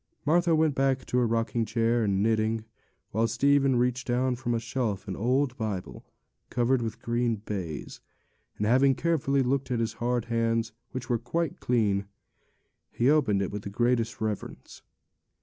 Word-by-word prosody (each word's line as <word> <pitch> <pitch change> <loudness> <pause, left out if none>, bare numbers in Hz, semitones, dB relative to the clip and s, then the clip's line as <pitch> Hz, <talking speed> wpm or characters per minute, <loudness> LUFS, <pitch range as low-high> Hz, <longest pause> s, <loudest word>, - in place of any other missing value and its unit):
Martha 170 +2 +3
went 155 -1 +3
back 135 -1 +1
to 125 - 0
her 120 - +2
rocking 115 +1 0
chair 115 +1 +1
and 100 -1 +1
knitting, 110 0 +1 0.5
while 115 +3 +1
Stephen 135 +2 +3
reached 125 +1 0
down 125 +1 +1
from 120 -1 -2
a - - 0
shelf 115 -3 -3
an 95 - -3
old 125 +3 +1
Bible, 105 -5 -4 0.5
covered 125 +1 +1
with 115 -1 -5
green 120 0 +1
baize, 85 -9 -5 0.6
and, 105 - -1
having 130 +4 +4
carefully 140 -4 +1
looked 130 +1 0
that 125 -2 0
his 115 0 -1
hard 120 -1 0
hands 115 -1 0 0.4
were 120 -2 +1
quite 160 +6 -2
clean, 100 -5 +1 0.8
he 125 +4 +3
opened 110 -11 +2
it 95 - -3
with 105 0 -4
the 100 - -6
greatest 120 +2 0
reverence. 110 -2 -5
120 Hz, 160 wpm, -28 LUFS, 110-130 Hz, 0.8 s, having